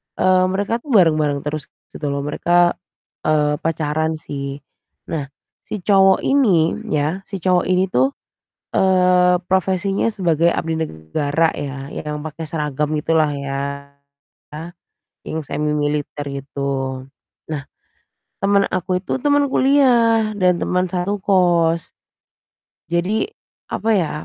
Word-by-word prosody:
eee, 185 0 +3
mereka 205 +5 -1
tuh 265 - -20
bareng-bareng 155 -6 +3
terus 150 0 -4 0.2
gitu 150 - -5
loh, 140 0 -2
mereka, 175 +4 +3 0.6
eee, 150 -1 +2
pacaran, 160 0 -1
sih. 140 -2 -6 0.5
Nah 150 -4 -2 0.4
si 205 -4 -5
cowok 195 -1 +4
ini, 200 - +3 0.2
ya, 155 0 0
si 195 -4 -6
cowok 180 -1 +2
ini 185 +1 +1
tuh, 130 +2 +2 0.5
eee, 180 -1 +3
profesinya 190 +3 +1
sebagai 170 -2 +2
abdi 160 0 -2
negara, 145 - 0
ya, 140 -1 -5
yang 150 -1 -5
pakai 155 +1 -6
seragam 150 -1 -2
gitulah 155 0 +1
ya, 140 -1 -4 1.7
yang 160 0 -3
semimiliter 150 0 -2
gitu. 135 -1 -3 0.5
Nah 145 -3 -4 0.7
teman 200 0 +3
aku 185 0 -1
itu 260 - -2
teman 285 0 +2
kuliah, 240 -6 +4
dan 180 -1 +4
teman 180 +1 0
satu 185 +3 -2
kos. 175 -4 +2 0.9
Jadi, 175 - 0 0.4
apa 225 - -3
ya, 165 -5 0
165 Hz, 115 wpm, -20 LUFS, 150-190 Hz, 1.7 s, cowok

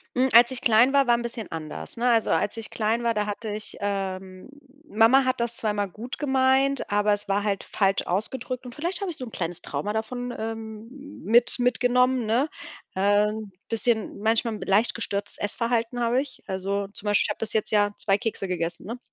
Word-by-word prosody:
Hm, 255 +1 +3
als 235 +2 +8
ich 260 0 -4
klein 240 0 +5
war, 280 -1 +4
war 240 - +4
'n 235 - -2
bisschen 235 -2 -6
anders, 155 -2 -6
ne? 245 +1 +1
Also, 230 -2 +3
als 210 - 0
ich 225 - -5
klein 225 +2 0
war, 230 -1 +2
da 210 -1 0
hatte 210 +1 -4
ich, 210 +1 -5
ähm 190 0 -4 0.4
Mama 230 +5 +5
hat 255 -1 0
das 235 0 -2
zwar 220 - -2
immer 205 -1 -1
gut 225 +7 -8
gemeint, 270 -1 +2
aber 205 0 +3
es 205 0 -4
war 200 +1 +1
halt 200 -2 -1
falsch 195 -1 +1
ausgedrückt. 250 +7 -3
Und 245 - -8
vielleicht 345 +7 -3
habe 390 -3 -2
ich 320 - -1
so 255 - -6
'n - - -8
kleines 170 -1 -4
Trauma 150 +9 -3
davon, 245 +3 -3
ähm, 220 0 -6 0.3
mit 240 +3 +3
mitgenommen, 250 0 +2
ne? 245 +8 +1 0.5
Äh, 205 +2 +3
'n 215 -1 -5 0.2
bisschen 225 -2 -1
manchmal 225 +1 +1
b - - -7
leicht 205 +5 +3
gestörtes 205 -2 -2
Essverhalten 230 +3 -1
habe 240 +2 +2
ich. 270 -2 -10
Also, 195 +1 -2
zum 205 +1 -12
Beispiel, 205 -1 +3
ich - - -6
habe - - -3
bis 225 - -3
jetzt 220 - 0
ja 205 -1 +3
2 195 -1 +1
Kekse 205 -2 -3
gegessen, 170 0 -3
ne? 235 +2 -5
225 Hz, 210 wpm, -25 LUFS, 205-245 Hz, 0.5 s, als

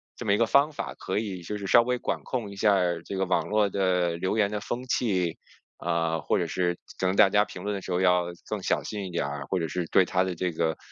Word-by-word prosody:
这 120 - -7
么 100 - +3
一 - - +3
个 115 - +3
方 140 +6 +4
法 - - -5
可 - - -3
以 100 -4 -3
就 105 +5 -4
是 100 - -6
稍 120 +5 +6
微 125 +1 0
管 - - -2
控 115 -6 -3
一 100 - -9
下 105 0 +4
儿 90 -3 +1
这 100 - -5
个 95 - +1
网 90 - 0
络 105 -1 +2
的 90 -3 +1
留 95 +5 -1
言 100 -1 +2
的 105 - -2
风 120 +4 -4
气， 95 -10 0 0.4
啊， 80 -1 0
或 - - 0
者 - - 0
是 90 -1 -1 0.2
可 95 - +1
能 95 - +1
大 100 -2 +7
家 105 +2 +4
评 90 - -9
论 105 - -2
的 100 - -5
时 95 - -7
候 90 - +1
要 90 -1 +4 0.2
更 - - -3
小 - - +1
心 105 -2 -5
一 - - -6
点 85 - -1
儿， 70 0 -5
或 95 - 0
者 80 - -1
是 90 -2 -2
对 95 - +5
他 90 +1 +1
的 95 -1 -3
这 90 +2 -1
个 80 -1 -1
95 Hz, 300 characters per minute, -27 LUFS, 90-105 Hz, 0.4 s, 大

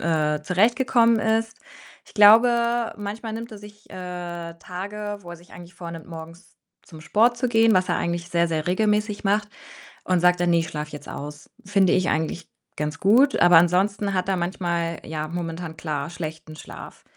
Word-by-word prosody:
äh, 155 -2 0
zurechtgekommen 230 - +3
ist. 225 +1 -1 0.5
Ich - - -19
glaube, 235 +2 +5
manchmal 215 +2 -6
nimmt 230 +1 -7
er 210 - -9
sich, 210 +1 -15
äh, 175 -2 -7
Tage, 205 +4 -6
wo 175 -3 -12
er 175 - -8
sich 175 +1 -20
eigentlich 175 0 -12
vornimmt, 170 -2 -9
morgens 165 +2 -11 0.3
zum 160 -3 -14
Sport 230 +8 +2
zu 250 +1 -1
gehen, 225 -2 +4
was 185 0 +2
er - - +1
eigentlich 170 0 -3
sehr, 170 -1 +2
sehr 155 -2 -2
regelmäßig 210 +2 0
macht 205 +1 +1 0.6
und 185 -1 +1
sagt 180 0 +3
dann: 175 -1 +2
„Ne, 170 - +4
ich 165 - -2
schlafe 150 0 -6
jetzt 145 - -9
aus.“ 150 +1 -8 0.2
Finde 195 -2 +3
ich 185 -1 +1
eigentlich 160 +2 -2 0.3
ganz 150 +1 -4
gut, 250 +8 +4
aber 175 -1 +7
ansonsten 195 +4 +2
hat 185 0 -1
er 190 - +1
manchmal, 170 -2 -2
ja, 155 -1 -4
momentan 165 0 -6
klar 150 -2 -4
schlechten 160 -1 -7
Schlaf. 155 - -11
180 Hz, 180 wpm, -23 LUFS, 165-210 Hz, 0.6 s, aber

